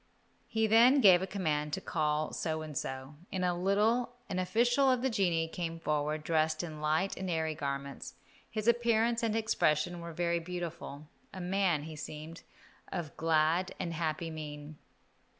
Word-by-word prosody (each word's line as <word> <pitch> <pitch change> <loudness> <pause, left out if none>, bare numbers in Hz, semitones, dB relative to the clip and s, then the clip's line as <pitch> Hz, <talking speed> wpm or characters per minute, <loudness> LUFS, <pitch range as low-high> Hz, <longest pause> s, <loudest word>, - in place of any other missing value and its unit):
He 220 0 +1
then 235 +6 +6
gave 185 -7 +7
a 190 - -2
command 150 -6 -1
to - - 0
call 155 -4 -1
So 160 -1 -2
and 155 -2 -8
So. 130 +2 -4 0.2
In 185 -1 -2
a 180 -1 +1
little 210 +7 +1
an 185 - -1
official 240 +9 +3
of 255 -1 +2
the 265 - +1
genii 175 -6 +1
came 165 0 -4
forward, 150 0 -1
dressed 155 0 +1
in 155 -3 -7
light 155 +6 +1
and 190 0 -4
airy 160 -2 0
garments. 140 -1 -5 0.3
His 215 0 -3
appearance 235 0 +3
and 225 -2 0
expression 175 -6 +1
were 170 0 -6
very 170 +1 0
beautiful, 170 -4 -6 0.2
a 190 - -8
man, 180 -4 +1
he 160 0 -7
seemed, 155 +2 -8 0.5
of 160 -5 -4
glad 165 +3 +2
and 175 -3 -3
happy 160 0 -2
mien. 150 -1 -8
170 Hz, 165 wpm, -32 LUFS, 155-195 Hz, 0.5 s, gave